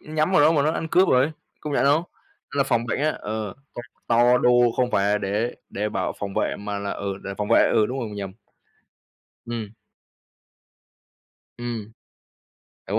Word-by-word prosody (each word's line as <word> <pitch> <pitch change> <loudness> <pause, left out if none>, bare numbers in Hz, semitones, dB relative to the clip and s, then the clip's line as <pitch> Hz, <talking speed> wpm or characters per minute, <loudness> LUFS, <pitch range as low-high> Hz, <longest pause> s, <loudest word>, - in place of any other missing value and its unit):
nhắm 155 +3 -1
vào 150 - +5
đó 155 +3 +6
mà 145 - +2
nó 155 - +2
ăn 160 - -3
cướp 185 +4 +4
rồi. 130 +5 +3 0.3
Công 150 - -5
nhận - - +2
không? 145 +4 +4 0.5
Là 140 - +2
phòng 120 -2 0
bệnh - - -1
á, 155 +1 +2
ờ, 105 -2 -4 0.2
tập 120 - -6 0.2
to 120 +1 +4
đô 125 - +3 0.3
không 125 -1 +1
phải 100 -1 +2
là 105 - +2
để 105 +4 -1 0.2
để 105 +2 -2
bảo 95 -3 -2
phòng 100 -1 -5
vệ - - 0
mà 100 0 -4
là, 100 0 -4
ừ, 100 -1 -4
để 100 - -4
phòng 105 - -2
vệ, - - +5
ừ, 110 -1 +4
đúng 130 +4 -4
rồi 120 - -3
mình 105 - -8
nhầm. 100 -2 -5 1.1
Ừm. 115 -2 -5 1.8
Ừm. 115 -3 -5 1.0
Đúng - - +1
115 Hz, 190 wpm, -24 LUFS, 105-140 Hz, 1.8 s, đó